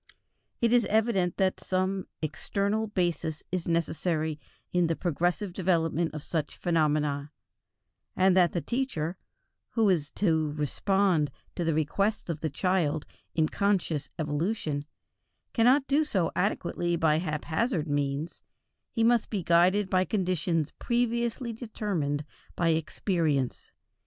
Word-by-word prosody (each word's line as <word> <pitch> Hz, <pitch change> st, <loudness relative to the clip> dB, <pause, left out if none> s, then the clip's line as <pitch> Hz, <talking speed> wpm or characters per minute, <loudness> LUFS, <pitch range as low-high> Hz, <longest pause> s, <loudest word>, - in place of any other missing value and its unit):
It 235 Hz, 0 st, +3 dB
is 240 Hz, -3 st, +5 dB
evident 210 Hz, -5 st, +1 dB
that 190 Hz, -1 st, +1 dB
some 185 Hz, 0 st, -1 dB, 0.2 s
external 200 Hz, +7 st, -1 dB
basis 175 Hz, -5 st, -1 dB
is 180 Hz, -2 st, -2 dB
necessary 160 Hz, -2 st, 0 dB, 0.3 s
in 175 Hz, -1 st, +3 dB
the 165 Hz, -, 0 dB
progressive 175 Hz, +4 st, -1 dB
development 170 Hz, -3 st, +1 dB
of 150 Hz, -, -5 dB
such 155 Hz, -3 st, -3 dB
phenomena, 150 Hz, -4 st, +1 dB, 0.8 s
and 185 Hz, 0 st, +4 dB
that 180 Hz, -3 st, +5 dB
the 175 Hz, -, -1 dB
teacher, 190 Hz, -, -2 dB, 0.5 s
who 225 Hz, -2 st, +2 dB
is 155 Hz, -5 st, 0 dB
to 160 Hz, -6 st, +1 dB
respond 165 Hz, +2 st, +1 dB, 0.3 s
to 175 Hz, -, -1 dB
the 165 Hz, -2 st, +1 dB
requests 195 Hz, +7 st, 0 dB
of 160 Hz, -, -5 dB
the 155 Hz, -, -1 dB
child 165 Hz, -2 st, 0 dB, 0.3 s
in 160 Hz, -1 st, +3 dB
conscious 180 Hz, -8 st, 0 dB
evolution, 150 Hz, -1 st, -1 dB, 0.7 s
cannot 255 Hz, +4 st, +4 dB
do 285 Hz, +3 st, +3 dB
so 190 Hz, -, 0 dB
adequately 175 Hz, -3 st, 0 dB
by 160 Hz, -2 st, +3 dB
haphazard 160 Hz, -, -1 dB
means; 145 Hz, +2 st, -2 dB, 0.5 s
he 230 Hz, -, 0 dB
must 235 Hz, 0 st, +3 dB
be 200 Hz, -5 st, -2 dB
guided 180 Hz, +5 st, +4 dB
by 185 Hz, -1 st, +3 dB
conditions 180 Hz, -5 st, 0 dB
previously 235 Hz, 0 st, 0 dB
determined 190 Hz, -, -2 dB, 0.3 s
by 170 Hz, -1 st, +2 dB
experience. 160 Hz, -, 0 dB
175 Hz, 125 wpm, -28 LUFS, 155-200 Hz, 0.8 s, is